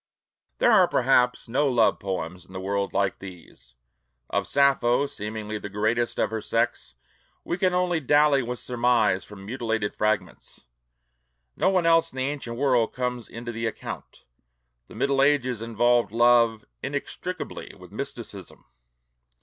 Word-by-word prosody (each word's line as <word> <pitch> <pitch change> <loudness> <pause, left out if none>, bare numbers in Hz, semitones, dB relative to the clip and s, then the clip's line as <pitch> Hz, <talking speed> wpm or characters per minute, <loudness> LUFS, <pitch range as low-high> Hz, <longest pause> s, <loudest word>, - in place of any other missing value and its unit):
There 240 - +4
are 190 -5 +6
perhaps 125 -3 +2
no 135 +5 +1
love 120 -3 +3
poems 90 -2 -4
in 95 - -16
the 95 - -5
world 100 +1 -2
like 100 -1 0
these. 90 -9 -12 0.6
Of - - 0
Sappho, 140 -2 +3
seemingly 110 -4 -5
the 105 - -7
greatest 110 +4 0
poet - - +2
of - - -9
her 110 -1 -3
sex, 115 +2 -1 0.5
we - - -2
can 185 -2 +2
only 180 -2 +1
dally 145 0 +4
with 125 0 -4
surmise 120 -6 +1
from 100 -2 -12
mutilated 110 -2 -2
fragments. 105 -10 -2 0.9
No - - +2
one 185 -3 +2
else 165 0 +4
in 130 - -13
the 130 - 0
ancient 135 -5 -4
world 125 -4 +2
comes 125 -2 -3
into 120 +1 -6
the 115 0 -3
account. 110 - -8 0.6
The - - -14
Middle 140 -1 +1
Ages 130 -5 +2
involved 115 -1 +2
love 115 -1 +4 0.2
inextricably - - -5
with - - -14
mysticism. - - -8
120 Hz, 150 wpm, -25 LUFS, 110-135 Hz, 0.9 s, are